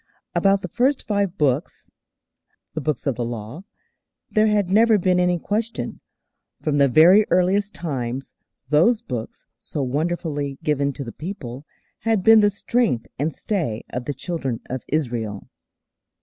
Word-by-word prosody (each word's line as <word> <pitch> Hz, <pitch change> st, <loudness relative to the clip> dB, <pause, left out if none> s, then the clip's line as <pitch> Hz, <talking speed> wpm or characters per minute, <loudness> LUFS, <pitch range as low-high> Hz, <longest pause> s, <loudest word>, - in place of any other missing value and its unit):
About 195 Hz, 0 st, +3 dB
the -, -, -2 dB
first 255 Hz, -, +1 dB
five 200 Hz, -3 st, 0 dB
Books 145 Hz, 0 st, -1 dB, 0.8 s
the 155 Hz, -, -3 dB
Books 145 Hz, -1 st, -2 dB
of 140 Hz, -, +1 dB
the 120 Hz, +1 st, -3 dB
Law 120 Hz, -, -6 dB, 0.7 s
there 215 Hz, 0 st, +3 dB
had 205 Hz, -3 st, +1 dB
never 220 Hz, +2 st, +5 dB
been 180 Hz, -1 st, +2 dB
any 180 Hz, 0 st, +2 dB
question. 220 Hz, +6 st, -3 dB, 0.6 s
From 145 Hz, -2 st, 0 dB
the 140 Hz, -, +6 dB
very 170 Hz, -, +7 dB
earliest 195 Hz, +3 st, +2 dB
times 135 Hz, -5 st, -4 dB, 0.4 s
those 175 Hz, +11 st, +4 dB
Books, 120 Hz, -, -6 dB
so 145 Hz, -, -4 dB
wonderfully 145 Hz, 0 st, -2 dB
given 140 Hz, -2 st, +1 dB
to 140 Hz, -, -6 dB
the 115 Hz, -, -7 dB
people, 150 Hz, -, -7 dB, 0.3 s
had 225 Hz, -4 st, +1 dB
been 225 Hz, +1 st, +8 dB
the 205 Hz, -1 st, +5 dB
strength 205 Hz, -, 0 dB
and 150 Hz, +3 st, 0 dB
stay 155 Hz, -, -2 dB
of 125 Hz, 0 st, -4 dB
the 145 Hz, -, -2 dB
Children 135 Hz, -5 st, -3 dB
of 130 Hz, -1 st, -3 dB
Israel. 120 Hz, -9 st, -2 dB
160 Hz, 150 wpm, -22 LUFS, 135-200 Hz, 0.8 s, been